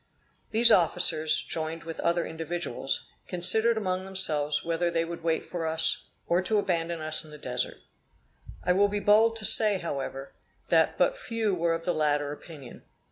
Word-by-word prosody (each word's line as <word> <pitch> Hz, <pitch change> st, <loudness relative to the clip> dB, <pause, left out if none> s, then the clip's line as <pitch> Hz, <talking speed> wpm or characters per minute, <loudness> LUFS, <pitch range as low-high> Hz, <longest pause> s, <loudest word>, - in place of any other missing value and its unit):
These 230 Hz, +2 st, +4 dB
officers, 165 Hz, -3 st, +4 dB
joined 160 Hz, 0 st, -4 dB
with 165 Hz, -1 st, -8 dB
other 170 Hz, 0 st, 0 dB
individuals, 160 Hz, -4 st, -3 dB, 0.2 s
considered 220 Hz, +6 st, +3 dB
among 185 Hz, -3 st, -2 dB
themselves 155 Hz, -6 st, +2 dB
whether 170 Hz, +1 st, -1 dB
they 165 Hz, -1 st, -1 dB
would 170 Hz, 0 st, -8 dB
wait 165 Hz, -1 st, -1 dB
for 170 Hz, -2 st, -4 dB
us, 160 Hz, 0 st, 0 dB, 0.2 s
or 175 Hz, +2 st, +1 dB
to 215 Hz, +3 st, 0 dB
abandon 170 Hz, -4 st, -1 dB
us 155 Hz, +1 st, -1 dB
in 155 Hz, -, -14 dB
the 150 Hz, -, -11 dB
Desert. 125 Hz, -4 st, -4 dB, 0.9 s
I 180 Hz, -, +2 dB
will 200 Hz, +2 st, +3 dB
be 205 Hz, 0 st, -3 dB
bold 220 Hz, +3 st, +3 dB
to 220 Hz, -1 st, -3 dB
say, 215 Hz, -2 st, +4 dB
however, 135 Hz, -5 st, -6 dB, 0.4 s
that -, -, +2 dB
but -, -, +2 dB
few 230 Hz, -, -3 dB
were 170 Hz, -1 st, 0 dB
of 165 Hz, 0 st, -8 dB
the 175 Hz, -, 0 dB
latter 145 Hz, -1 st, 0 dB
opinion. 145 Hz, -5 st, -12 dB
170 Hz, 170 wpm, -27 LUFS, 160-195 Hz, 0.9 s, These